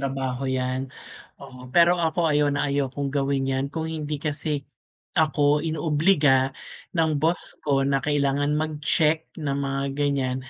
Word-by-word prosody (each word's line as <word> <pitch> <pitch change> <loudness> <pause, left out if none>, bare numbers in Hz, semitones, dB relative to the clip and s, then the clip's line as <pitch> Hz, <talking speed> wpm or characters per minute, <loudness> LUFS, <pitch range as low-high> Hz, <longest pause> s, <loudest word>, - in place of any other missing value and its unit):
trabaho 135 -1 -2
'yan, 130 0 -2 0.5
oo 125 0 -12
pero 175 +5 +4
ako 165 +1 0
ayaw 145 0 +3
na 145 0 0
ayaw 140 -1 0
kong 140 +1 -4
gawin 140 -1 0
'yan 135 0 -1
kung 160 +2 -4
hindi 155 -2 -3
kasi 145 -1 -3 0.5
ako 150 -2 +2
inoobliga 150 -4 +2 0.4
ng 160 -3 +1
boss 165 +3 +1
ko 135 -2 +1
na 135 0 +1
kailangan 145 +1 +1
mag-check 155 +1 +1
ng 140 -3 -2
mga 135 0 -2
ganyan 140 -3 0
145 Hz, 145 wpm, -24 LUFS, 135-155 Hz, 0.5 s, pero